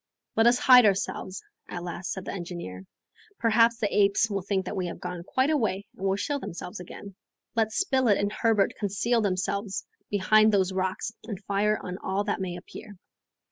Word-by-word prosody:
"Let 225 +1 +5
us 240 +1 +5
hide 250 -3 +7
ourselves," 190 -1 -2 0.3
at 175 - -5
last 175 +1 -5
said 190 - -5
the - - -4
engineer. 170 - -7 0.5
"Perhaps 230 0 +4
the 210 -3 -1
apes 200 +2 +3
will 200 -1 -1
think 190 0 -1
we 185 -2 -2
have 170 - -7
gone 180 -1 -5
quite 260 - +1
away 215 -9 0
and 195 - -3
will 190 - +2
show 285 +8 -2
themselves 180 -2 -7
again. 195 +2 -10 0.4
Let 220 -1 +2
Spilett 260 - +2
and 205 +1 -1
Herbert 215 -3 +2
conceal 210 +4 +1
themselves 195 0 -2 0.2
behind 215 +2 +4
those 190 -2 +2
rocks 190 +3 -2
and 205 -5 -5
fire 205 +2 +1
on 180 +1 -5
all 190 +2 -1
that 205 -1 -2
may 180 -2 -3
appear." 205 +3 -10
200 Hz, 180 wpm, -27 LUFS, 185-220 Hz, 0.5 s, hide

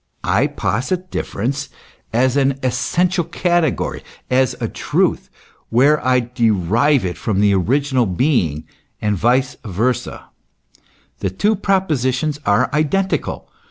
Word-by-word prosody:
I 105 +10 +2
posit 145 - -2
difference 135 +6 -3 0.4
as 125 +3 +2
an 135 -1 +2
essential 175 +8 +1
category, 170 -2 0 0.3
as 130 0 +2
a - - -1
truth, - - -1 0.4
where 140 +6 +3
I 125 0 +3
derive 120 - +1
it 90 - -4
from 100 -3 -1
the 100 0 +4
original 130 +5 +1
being, 90 - 0 0.4
and 105 -1 0
vice 125 +6 +1
versa: 115 +4 -2 0.9
the 95 - -1
two 205 - +1
propositions 155 -7 0
are 115 +5 +3
identical. 170 +6 -1
130 Hz, 115 wpm, -19 LUFS, 110-150 Hz, 0.9 s, the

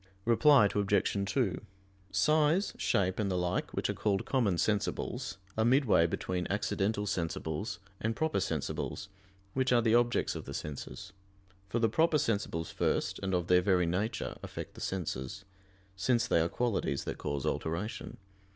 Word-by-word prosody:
Reply 125 0 +6
Obj. 100 -1 +1
2: 100 -7 0 0.5
Size, 155 - +3
shape, 95 0 +1
and 105 -2 +1
the 90 - 0
like, 90 +1 -1
which - - -1
are - - -1
called 100 -2 0
"common 115 -9 +2
sensibles," 105 +2 -1 0.2
are 110 - +2
midway 120 - +4
between 90 +1 -2
"accidental 105 +1 0
sensibles" 85 0 -2 0.2
and 115 +1 -1
"proper 160 -7 0
sensibles," 90 +2 -3 0.4
which 130 0 +1
are 120 -2 +4
the 110 -1 +3
objects 120 0 +2
of - - -6
the - - -6
senses. 75 +5 -6 0.6
For 115 - -1
the 115 -1 +3
proper 160 +8 +3
sensibles 100 - -1
first, - - 0
and 95 -1 0
of 90 -1 0
their 90 0 +5
very 90 -2 +3
nature, 95 +7 -2
affect - - -7
the - - -11
senses; 90 -1 -4 0.5
since 120 +5 +2
they - - +3
are 85 - +1
qualities 115 - -1
that - - -5
cause 70 -2 -3
alteration. 85 +7 -3
100 Hz, 155 wpm, -31 LUFS, 90-115 Hz, 0.6 s, Reply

